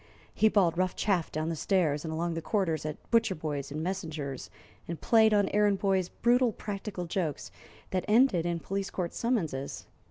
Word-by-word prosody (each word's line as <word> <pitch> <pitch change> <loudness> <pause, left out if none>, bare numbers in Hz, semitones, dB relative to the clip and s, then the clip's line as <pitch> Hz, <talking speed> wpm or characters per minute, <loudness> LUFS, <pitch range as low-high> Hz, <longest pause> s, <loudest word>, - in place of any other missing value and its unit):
He 220 - +4
bawled 180 -5 +2
rough 185 0 +1
chaff 185 -6 0
down 155 +1 -2
the 165 - -2
stairs 155 -4 +1
and 160 - -4
along 170 +2 -1
the 165 - -3
corridors 165 -5 -1
at 150 - -8
butcher 225 -4 +3
boys 145 -3 -4
and 155 +2 -3
messengers, 160 -8 -4 0.4
and 170 -1 -5
played 220 -1 +5
on 205 -2 +3
errand 205 -1 +3
boys 190 -2 +1
brutal 245 0 +2
practical 200 -3 -5
jokes 165 -4 -3 0.4
that 185 -2 -1
ended 215 -5 +4
in 170 -1 -2
police 195 0 -3
court 175 -3 -3
summonses. 165 - -2
185 Hz, 180 wpm, -29 LUFS, 160-205 Hz, 0.4 s, played